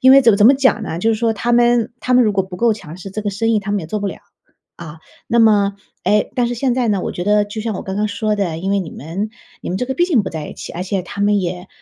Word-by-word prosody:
因 260 -1 +7
为 275 0 +8
怎 230 - +6
么 200 - +2
怎 210 - +6
么 270 - +7
讲 265 0 +2
呢？ 165 - -4
就 225 +5 +1
是 - - +2
说 225 +1 +1
他 235 +4 -1
们 240 -1 +3
他 250 - 0
们 250 -1 +6
如 210 - +2
果 195 -1 +1
不 185 -1 -9
够 230 +1 +3
强 175 -6 -9
势 190 +1 -9
这 215 - -4
个 205 - -2
生 225 +3 -1
意 220 - +3
他 200 - -5
们 205 -1 0
也 160 - -7
做 210 +5 -3
不 205 - -2
了， - - -4 0.6
啊。 160 -2 -10 0.3
那 235 - +1
么 205 -3 +4 0.3
诶， 210 0 +2
但 245 -2 +1
是 245 - -2
现 245 +1 0
在 250 -2 0
呢， 200 -3 +1
我 - - -3
觉 175 - -4
得 210 0 +3
就 210 +1 -6
像 220 -2 -3
我 - - -5
刚 190 - -5
刚 210 0 0
说 210 +1 -1
的， 180 -6 -2
因 190 +3 -3
为 200 - +2
你 180 -5 -4
们 175 +9 -5 0.3
你 - - -7
们 180 - -2
这 250 - -1
个 265 - -2
毕 350 - +2
竟 265 - +2
不 - - -5
在 155 -2 -5
一 - - -9
起， - - -8
而 175 - -4
且 190 0 -2
他 200 +2 -8
们 205 0 +3
也 180 0 -4
210 Hz, 350 characters per minute, -18 LUFS, 190-235 Hz, 0.6 s, 为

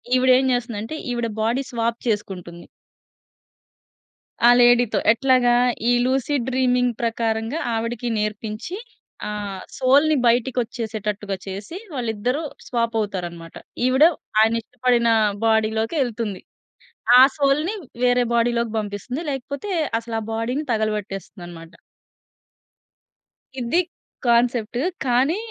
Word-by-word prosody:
ఈవిడ 255 0 +3
ఏం 265 - 0
జేస్తుందంటే, 235 +1 -3 0.2
ఈవిడ 235 -1 -1
బాడీ 235 +5 +1
స్వాప్ 235 -1 -1
చేసుకుంటుంది. 185 -5 -4 1.8
ఆ - - +9
లేడీ‌తో 245 -1 +4
ఎట్లాగా? 250 -1 +3 0.4
ఈ - - +5
లూసీ 265 +2 0
డ్రీమింగ్ 250 -1 +2
ప్రకారంగా 225 +3 -1 0.2
ఆవిడకి 230 +1 -3
నేర్పించి 215 - -4 0.5
ఆ! - - -3 0.5
సోల్‌ని 285 +4 +4
బయటికి 240 +2 +2
ఒచ్చేసేటట్టుగా 210 -3 -4
చేసి, 200 - -7 0.2
వాళ్ళిద్దరూ 245 +4 -2 0.2
స్వాప్ 230 -2 -1
అవుతారనమాట. 175 -5 -5 0.3
ఈవిడ 260 +4 +5 0.4
ఆయన 225 +1 +4
ఇష్టపడిన 245 0 +1 0.4
బాడీ‌లోకెళ్తుంది 220 - 0 0.8
ఆ - - +10 0.2
సోల్‌ని 295 +8 +1 0.3
వేరే 245 0 +3
బాడీ‌లోకి 235 -1 +1
బంపిస్తుంది, 215 +9 -5
లేకపోతే 280 +9 -5 0.3
అసలు 230 0 -7
ఆ - - -6
బాడీని 245 +7 -2
తగలబెట్టేస్తుందనమాట. 195 -5 -4 1.9
ఇది 240 +8 0 0.5
కాన్సెప్ట్. 235 -1 +2 0.3
కానీ 260 +8 +2
235 Hz, 95 wpm, -22 LUFS, 215-255 Hz, 1.9 s, ఆ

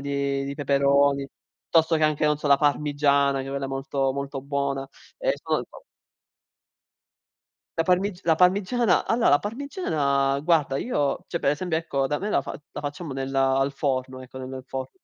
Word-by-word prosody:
di 140 -1 -1
di 140 0 -4
peperoni, 140 0 +2 0.4
piuttosto 160 0 +3
che 155 - +2
anche, 155 0 +1
non 150 -1 +2
so, 150 - -4
la 140 - +7
parmigiana, 145 -1 +2
che 135 - -6
è - - -5
quella 140 0 -3
molto 135 0 -1
molto 140 0 -4
buona. 140 -1 -2 0.3
Ehm, - - +1
sono - - 0
il - - -8
top. - - -14 2.0
La - - +2
parmig 185 +1 +1
la 165 - +4
parmigiana, 195 +5 +3
allora, 230 +1 +2
la 145 - +6
parmigiana, 150 - -1
guarda, 150 -4 +2
io, 145 - -1
cioè, - - -2
per 140 - +2
esempio, 160 +3 -1
ecco, 140 -4 -1
da 145 +2 -1
me 205 +2 -3
la - - +2
fa - - -7
la - - -5
facciamo 145 +2 -5
nel 135 0 -4
al 135 0 +2
forno, 130 -2 -2
ecco 130 +1 -10
nel 130 0 -7
forno 130 -1 -5
140 Hz, 180 wpm, -25 LUFS, 135-160 Hz, 2.0 s, la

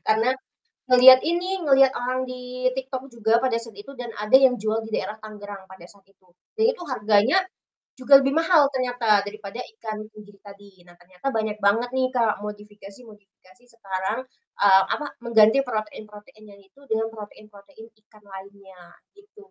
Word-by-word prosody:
Karena 225 +4 +2 0.6
ngelihat 255 +1 +8
ini, 360 +3 -1
ngelihat 270 -1 +5
orang 255 +1 -2
di 255 0 -3
TikTok 265 0 -6
juga 230 +1 +1
pada 250 -3 0
saat 230 -1 -5
itu 240 +7 -11
dan 240 -1 -6
ada 210 +5 +3
yang 265 -2 +4
jual 215 +1 -2
di - - -11
daerah 215 +1 -4
Tangerang 205 -2 -10
pada 190 -2 -14
saat 200 -2 -20
itu. 195 -1 -32 0.3
Jadi 445 0 +2
itu 355 - -12
harganya 220 - +2 0.6
juga 270 +2 +6
lebih 270 +1 0
mahal 325 -3 +4
ternyata 245 -5 +1
daripada 210 +2 -8 0.2
ikan 215 -1 -7
tenggiri 205 -1 -15
tadi. 200 -2 -16
Nah 175 - -18
ternyata 180 +7 -14
banyak 220 -1 -2
banget 225 +5 +1
nih 260 -1 +1
Kak 230 -3 +1
modifikasi-modifikasi 210 0 -13
sekarang, 195 +1 -4 0.4
eee, 195 -1 +6
apa, 295 - -5 0.2
mengganti 220 +1 +4
protein-protein 215 -1 -8
yang 200 - -19
itu 195 +8 -26
dengan 220 0 -1
protein-protein 215 +2 -14 0.2
ikan 215 -1 -23
lainnya, 190 -2 -14 0.2
gitu. 410 0 -20
220 Hz, 155 wpm, -23 LUFS, 205-255 Hz, 0.6 s, ngelihat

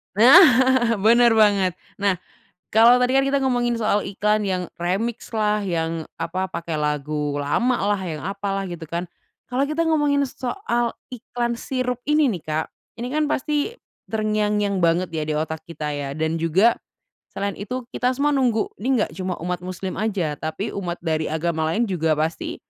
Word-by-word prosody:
Nah 255 - +9 0.6
bener 235 +3 +5
banget, 205 -4 +4 0.2
nah 200 -3 0 0.5
kalau 230 +3 +7
tadi 250 0 +2
kan 270 0 +4
kita 280 0 +2
ngomongin 245 -2 +1
soal 215 -2 +1
iklan 210 +2 +1
yang 185 -1 -1 0.2
remix-lah, 210 +2 -1
yang 165 -4 -2
apa 185 +3 -3
pakai 165 -4 -4
lagu 150 0 -1
lamalah, 205 - +1
yang 155 -2 -5
apalah, 195 0 -3
gitu 175 -4 -7
kan, 170 +2 -3 0.5
kalau 270 +3 +1
kita 315 +2 0
ngomongin 295 -3 +2
soal 245 - -2 0.2
iklan 240 0 -3
sirup 250 -2 -2
ini 300 -4 +3
nih, 180 - -5
Kak, 155 +1 -3 0.2
ini 245 +2 -5
kan 305 0 +1
pasti 300 - -1 0.3
terngiang-ngiang 210 -2 0
banget 170 +1 +1
ya 155 -1 -3
di 150 - 0
otak 160 0 -2
kita 150 -3 -4
ya 140 -1 -4
dan 160 +1 -1
juga 185 +8 +4 0.6
selain 200 0 -3
itu 250 +5 -5
kita 250 0 +1
semua 290 +2 +2
nunggu 240 -5 +1
ini 255 +1 +1
nggak - - -11
cuma 185 -1 -2
umat 180 0 -2
Muslim 185 +1 -5
aja, 190 -9 -1
tapi 160 +7 -4
umat 175 -3 -4
dari 160 -1 0
agama 160 0 -1
lain 220 +9 +1
juga 160 -4 +1
pasti 160 +2 -2
200 Hz, 160 wpm, -22 LUFS, 165-240 Hz, 0.6 s, Nah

